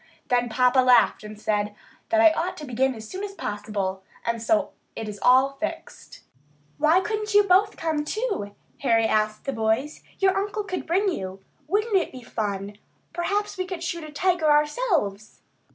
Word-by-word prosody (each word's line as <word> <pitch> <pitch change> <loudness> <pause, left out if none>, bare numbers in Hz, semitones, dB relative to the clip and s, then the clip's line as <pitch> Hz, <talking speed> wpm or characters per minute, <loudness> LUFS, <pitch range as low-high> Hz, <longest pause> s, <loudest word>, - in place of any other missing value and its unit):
Then 245 -1 +2
papa 250 +3 +3
laughed 250 -4 +4
and 210 0 -9
said 210 -1 -1 0.3
that 335 - +3
I 330 -1 +7
ought 355 +3 -2
to 300 - -7
begin 260 +1 0
as 220 -1 -9
soon 375 - -6
as 400 -1 -6
possible, 205 - -3 0.2
and 235 -1 -1
so 305 +6 +1 0.2
it 225 - -5
is 205 -1 -7
all 260 +2 +5
fixed. 320 - -7 0.6
"Why 315 +5 +4
couldn't 425 0 -3
you 415 - +8
both 400 +2 +3
come, 315 -2 -1
too?" 385 - -3 0.2
Harry 230 -4 +3
asked 215 -1 0
the 275 - -2
boys. 225 +6 -1 0.2
"Your 385 -1 +3
uncle 410 +2 -2
could 370 -2 -5
bring 385 +5 +2
you. 190 - -5 0.3
Wouldn't 420 +5 +1
it 375 - +2
be 255 -2 -10
fun! 205 -2 -4 0.3
Perhaps 400 +3 -2
we 370 - 0
could 365 -3 -5
shoot 335 -1 -3
a 310 - -9
tiger 345 0 +1
ourselves!" 295 - +1
295 Hz, 175 wpm, -25 LUFS, -, 0.6 s, you